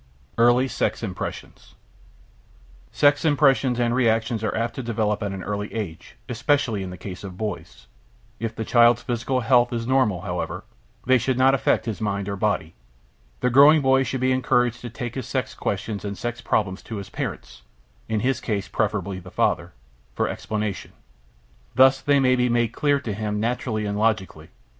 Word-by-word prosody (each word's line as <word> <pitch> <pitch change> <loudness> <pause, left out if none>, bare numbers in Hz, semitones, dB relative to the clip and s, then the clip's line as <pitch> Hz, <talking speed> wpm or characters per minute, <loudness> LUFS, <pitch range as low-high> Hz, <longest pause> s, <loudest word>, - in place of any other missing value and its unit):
EARLY 120 +2 +5
SEX 130 - -2
IMPRESSIONS 95 -4 -7 1.2
Sex 145 +1 +3
impressions 135 -5 +3
and 120 -1 +1
reactions 115 -2 +1
are 110 - -1
apt 115 +1 -1
to - - -5
develop 110 -3 -1
at 100 -2 -2
an 95 -1 -6
early 105 0 -4
age, 95 -8 -6
especially 120 -2 0
in 95 - -5
the 90 - -8
case 90 0 -8
of 95 -2 -8
boys. 105 - -6 0.5
If 115 0 -4
the 110 - -4
child's 120 0 +4
physical 125 +2 -1
health 120 0 +3
is 115 -1 -3
normal, 120 -8 +2
however, 90 -2 -4 0.4
they 130 0 +4
should 130 +2 -1
not 130 +1 +5
affect 135 - +1
his 110 -4 -4
mind 100 -2 -2
or 100 - -2
body. 100 -5 -1 0.7
The 125 - +1
growing 145 +4 +7
boy 135 0 +4
should 130 0 -2
be 130 0 +2
encouraged 125 -2 +1
to 120 - -6
take 120 0 -6
his 130 -3 -5
sex - - -2
questions 100 +1 -3
and 100 -1 -5
sex 120 0 -4
problems 95 -3 -1
to 115 - -7
his 100 -2 -7
parents - - -6 0.5
(in 110 -1 0
his 130 0 0
case 105 -4 -2
preferably 100 -3 -2
the 90 0 -12
father) - - 0 0.4
for - - 0
explanation. 105 -2 -4 0.8
Thus 130 +1 +5
they 145 -1 +3
may 130 -1 +4
be 125 0 +1
made 120 -1 +2
clear 145 -1 +1
to 115 -6 -4
him 105 0 -3
naturally 110 -1 -1
and 100 0 -2
logically. 100 -8 -1
115 Hz, 175 wpm, -23 LUFS, 105-130 Hz, 1.2 s, growing